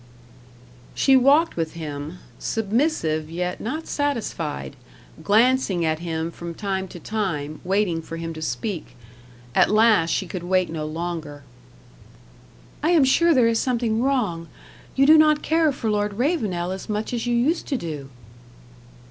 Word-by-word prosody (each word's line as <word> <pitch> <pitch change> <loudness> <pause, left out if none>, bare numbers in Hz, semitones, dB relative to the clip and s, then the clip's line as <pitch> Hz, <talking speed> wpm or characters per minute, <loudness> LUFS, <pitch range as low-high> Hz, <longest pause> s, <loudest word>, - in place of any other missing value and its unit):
She 270 - +4
walked 280 +6 +4
with 165 -2 -2
him, 155 0 -6 0.2
submissive 210 - 0
yet 180 +2 -3
not 305 +8 -4
satisfied, 225 - -3 0.5
glancing 215 -3 +3
at 155 0 0
him 165 -1 -3
from 170 0 -8
time 190 -1 -3
to 175 - -10
time, 165 -9 -3
waiting 185 -3 0
for 165 +1 -8
him 165 0 -5
to 155 - -8
speak. 160 - -4 0.6
At - - +4
last 215 -6 +4
she 190 - 0
could 180 0 -6
wait 185 0 +1
no 155 -2 -4
longer. 160 -3 -5 1.4
"I 310 - +1
am 335 -5 +5
sure 335 +6 +4
there 245 -3 +5
is 230 -1 +2
something 235 -3 0
wrong. 215 -12 0 0.5
You 275 - +4
do 310 +2 +8
not 305 -1 +4
care 320 -1 +3
for 235 -5 -2
Lord 205 0 0
Ravenel 210 - -1
as 190 +2 -6
much 210 +3 -2
as 240 0 -2
you 240 - +1
used 290 +8 +1
to 275 - -1
do." 150 - -6
200 Hz, 150 wpm, -23 LUFS, 165-250 Hz, 1.4 s, do